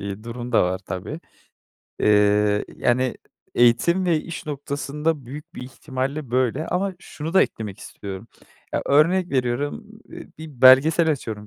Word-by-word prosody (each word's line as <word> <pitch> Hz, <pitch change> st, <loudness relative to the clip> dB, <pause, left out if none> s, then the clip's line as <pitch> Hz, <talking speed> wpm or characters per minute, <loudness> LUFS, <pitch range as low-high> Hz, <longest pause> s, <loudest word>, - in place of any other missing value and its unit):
iii, 100 Hz, +2 st, -6 dB
durum 120 Hz, +1 st, -6 dB
da -, -, +5 dB
var 90 Hz, +1 st, -1 dB
tabii. 95 Hz, -, -6 dB, 0.8 s
Eee, 105 Hz, 0 st, +3 dB
yani 125 Hz, +1 st, +1 dB, 0.4 s
eğitim 145 Hz, +10 st, +3 dB
ve 160 Hz, -3 st, +2 dB
iş 165 Hz, -1 st, -8 dB
noktasında 145 Hz, 0 st, -3 dB
büyük 145 Hz, +4 st, -10 dB
bir -, -, -7 dB
ihtimalle 130 Hz, +1 st, -5 dB
böyle 130 Hz, +4 st, 0 dB
ama 190 Hz, +2 st, -1 dB
şunu 160 Hz, 0 st, -7 dB
da 190 Hz, -, +7 dB
eklemek 105 Hz, -2 st, -5 dB
istiyorum. 100 Hz, +2 st, -9 dB, 0.4 s
Ya, -, -, -1 dB
örnek 170 Hz, +6 st, +3 dB
veriyorum, 135 Hz, -, -1 dB, 0.2 s
eee, 340 Hz, 0 st, -10 dB
bir 155 Hz, -6 st, -11 dB
belgesel 150 Hz, +6 st, +7 dB
açıyorum 110 Hz, -7 st, -4 dB
130 Hz, 140 wpm, -23 LUFS, 115-155 Hz, 0.8 s, da